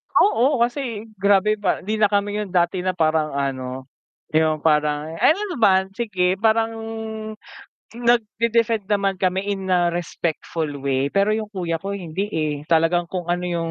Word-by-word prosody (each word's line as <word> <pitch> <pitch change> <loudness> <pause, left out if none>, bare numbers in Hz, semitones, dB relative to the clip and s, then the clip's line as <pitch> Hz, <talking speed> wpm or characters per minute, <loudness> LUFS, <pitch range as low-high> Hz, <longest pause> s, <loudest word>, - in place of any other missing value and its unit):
Oo, 270 - +4
kasi 240 -4 -3
grabe 205 +1 +3
ba 195 - 0
hindi 215 +2 -2
na 210 - +5
kami 205 0 0
yun 205 -3 -4
dati 175 +1 +2
na 185 0 -1
parang 155 -3 +1
ano, 130 -1 -3 0.5
yung 155 -1 +1
parang 150 0 +1
ay 165 - -8
ano 400 - -6
naman, 190 -3 +3
sige, 190 -5 0
parang 225 0 +2 1.2
nagde-defend 230 -2 +1
naman 200 -1 +2
kami 190 +1 0
in 195 -2 -3
a 175 -1 +3
respectful 165 -1 -3 0.2
way, 135 0 +1
pero 200 +5 +2
yung 215 0 -1
kuya 170 -3 -2
ko 200 +1 -4
hindi, 185 +1 -3
eh, 155 -2 0
talagang 170 +1 +2
kung 175 -1 -4
ano 175 0 0
yung 170 -1 -2
190 Hz, 160 wpm, -22 LUFS, 165-210 Hz, 1.2 s, na